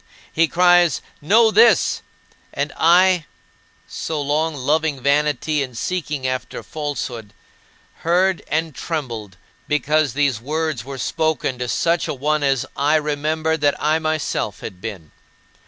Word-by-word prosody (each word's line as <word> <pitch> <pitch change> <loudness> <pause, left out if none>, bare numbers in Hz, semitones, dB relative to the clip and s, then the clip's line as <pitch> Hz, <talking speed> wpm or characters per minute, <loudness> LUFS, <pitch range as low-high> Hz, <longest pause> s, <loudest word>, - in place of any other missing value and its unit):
He 165 +1 +3
cries, 175 -2 +4 0.2
"Know 220 +8 +4
this," 455 - +4 0.5
and - - -2
I 180 0 +4 0.6
so 160 -2 -4
long 150 +2 0
"loving 145 +1 0
vanity, 150 +2 +1
and 125 -4 -5
seeking 150 -4 -3
after 130 0 -3
falsehood" 130 -8 -5 0.6
heard 180 +2 +1
and 160 0 -1
trembled, 115 - -5 0.3
because 150 -2 +1
these 140 -6 +1
words 155 -2 -2
were 135 +1 -7
spoken 155 -2 -1
to 125 - -2
such 170 +7 0
a - - -3
one 150 +3 0
as 135 -3 +1
I 145 +3 +2
remembered 155 +1 -1
that 145 -1 +2
I 155 +3 +2
myself 155 - -2
had 90 -4 -8
been. 95 -8 -7
150 Hz, 130 wpm, -20 LUFS, 135-160 Hz, 0.6 s, cries